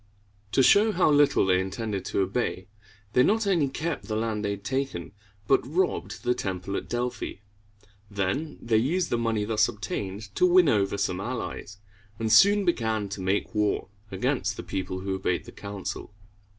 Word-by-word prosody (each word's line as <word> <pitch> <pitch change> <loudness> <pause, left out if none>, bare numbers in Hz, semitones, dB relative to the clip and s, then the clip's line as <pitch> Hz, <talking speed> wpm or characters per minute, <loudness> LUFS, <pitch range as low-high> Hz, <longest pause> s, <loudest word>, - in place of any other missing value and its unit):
To 135 - +4
show 210 - +6
how 180 -4 +3
little 145 -7 +4
they 90 -1 +3
intended 100 +1 -4
to - - 0
obey, 95 -1 -1 0.5
they 125 - +5
not 215 - +3
only 175 -8 +2
kept 155 +4 -3
the 110 - -3
land 110 -1 -1
they 100 - 0
had 100 -1 -4
taken, 130 -8 -3 0.4
but 135 - +4
robbed 175 +7 -1
the 125 0 +2
temple 95 -2 -4
at - - -4
Delphi. 120 +1 -2 0.8
Then 100 +10 -2
they 115 -2 +1
used 165 +10 0
the 120 - +1
money 115 -3 0
thus 110 0 +3
obtained 100 -1 -5
to 180 - +3
win 180 -3 +5
over 100 -2 +1
some 95 -2 -1
allies, 105 -2 -5 0.4
and 110 -1 0
soon 200 - +6
began 110 - 0
to 100 0 -5
make 95 +2 -1
war 105 -2 0 0.2
against 95 - -1
the - - -5
people 95 -1 -4
who 95 0 -2
obeyed 95 -2 -1
the - - -10
council. 100 0 -6
110 Hz, 175 wpm, -27 LUFS, 100-135 Hz, 0.8 s, show